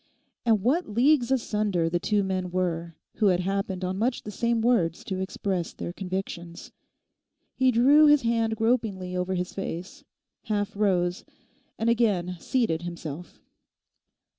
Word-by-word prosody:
And 220 -4 +3
what 295 +8 +1
leagues 245 +3 +3
asunder 210 -9 0
the 175 +1 0
two 205 +2 +1
men 185 -1 -2
were 170 -2 -2 0.2
who 210 - +3
had 180 -2 +3
happened 190 0 -2
on 185 +1 -3
much 240 +3 0
the 210 - -6
same 235 +3 0
words 220 -9 +1
to 190 -1 -4
express 190 -2 -3
their 175 - -6
convictions. 180 -3 -6 0.8
He 260 0 +3
drew 275 +6 +6
his 295 -2 +5
hand 230 -1 +1
gropingly 220 -6 0
over 180 +1 -1
his 180 0 -3
face, 195 - -6 0.4
half 210 -2 -2
rose, 180 -3 +1 0.5
and 225 - -1
again 200 -7 +1
seated 225 -10 0
himself. 170 -1 -8
195 Hz, 140 wpm, -26 LUFS, 180-230 Hz, 0.8 s, drew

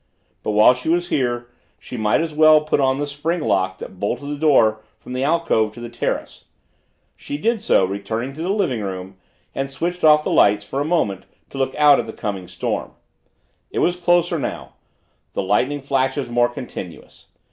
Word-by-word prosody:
But, 105 - -2
while 105 +4 +6
she 125 +5 -5
was 175 +1 +1
here, 120 -3 -1 0.3
she - - -10
might 110 +2 +1
as 165 -2 -3
well 155 0 +6
put 150 -1 0
on 130 -1 +2
the 145 - -1
spring 145 +5 -2
lock 95 - 0
that 95 - -10
bolted 120 +7 -2
the 145 - -2
door 130 -8 +3 0.2
from 125 - -9
the 130 +1 -1
alcove 140 -9 +1
to - - -10
the 120 0 -7
terrace. 120 - -4 0.7
She 145 - -6
did 225 +6 0
so, 215 - +3
returned 110 +7 -4
to 155 - -8
the 175 - -2
living 185 - 0
room 95 -1 -6 0.4
and 135 0 -3
switched 175 +6 -4
off 150 -1 +6
the - - -2
lights 105 0 +4
for 135 +7 -3
a - - -1
moment 150 - 0 0.3
to 135 - -7
look 135 0 -1
out 150 -1 +6
at 115 - -3
the 110 - -7
coming 95 -5 -5
storm. - - -4 0.8
It - - -7
was 175 - +2
closer 175 -1 +2
now - - -5 0.6
the - - -2
lightning 125 +9 0
flashes 135 -1 -1
more 120 0 +3
continuous. 100 -8 -9
135 Hz, 190 wpm, -21 LUFS, 110-155 Hz, 0.8 s, while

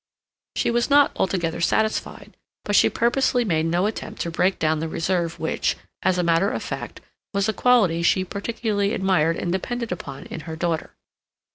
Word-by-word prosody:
She - - +1
was 240 +3 +1
not 285 0 +5
altogether 170 -3 -1
satisfied; 220 +5 -1 0.3
but 205 - 0
she - - +6
purposely 245 0 +1
made 160 -5 +1
no 175 +3 +1
attempt 215 0 -4
to 170 - -4
break 180 +3 +1
down 155 0 +1
the 165 - -2
reserve 170 0 -1
which, 160 - -1 0.2
as 185 -1 +2
a 180 - +1
matter 170 +4 +3
of - - -3
fact, - - -6 0.3
was 200 +1 +2
a 220 - +1
quality 210 -11 +3
she 185 +2 +2
particularly 205 +1 -1
admired 165 -4 +2
and 175 - -2
depended 235 +5 -3
upon 140 -6 -6
in - - -7
her 160 - -4
daughter. 165 -1 -2
185 Hz, 175 wpm, -23 LUFS, 165-220 Hz, 0.3 s, she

